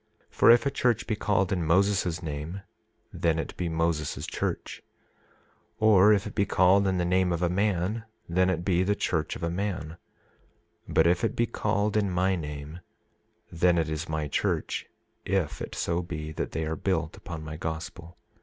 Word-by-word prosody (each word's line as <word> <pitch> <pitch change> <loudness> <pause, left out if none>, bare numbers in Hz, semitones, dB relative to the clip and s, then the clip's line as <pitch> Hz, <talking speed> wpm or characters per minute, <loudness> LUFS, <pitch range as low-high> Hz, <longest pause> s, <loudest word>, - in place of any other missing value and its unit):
For - - +4
if 120 +2 +7
a 140 - +1
church 120 -4 +1
be 110 - -1
called 100 -3 +1
in 90 -3 -1
Moses' 90 0 +2
name 80 +5 -5 0.5
then 80 -1 +1
it 80 - -4
be 90 -1 -2
Moses' 80 -2 -1
church; - - -4 1.0
or 105 -2 +6
if 100 -2 +3
it 105 - -6
be 100 - +2
called 100 0 +4
in 95 -1 +1
the 90 - 0
name 90 0 +2
of 85 0 -1
a 85 - +2
man 100 +3 0 0.2
then 90 +2 +2
it 85 -1 -1
be 90 -2 +2
the 100 +2 +1
church 80 -6 -1
of - - -8
a 85 - 0
man; 90 -4 -3 0.9
but 80 - +3
if 90 +1 +2
it - - 0
be 120 - +2
called 105 -1 -1
in 105 -2 +2
my 95 +1 +1
name 75 0 -6 0.7
then 85 +1 +3
it 80 -1 0
is 80 +1 -4
my 80 -1 -2
church, 70 - -1 0.4
if 95 -4 -1
it - - -6
so 85 +1 -1
be 80 -3 -6
that - - -4
they 80 - -2
are 80 +1 -2
built - - -1
upon 80 -2 -8
my 80 0 -6
gospel. 85 +2 -6
90 Hz, 185 wpm, -27 LUFS, 80-100 Hz, 1.0 s, if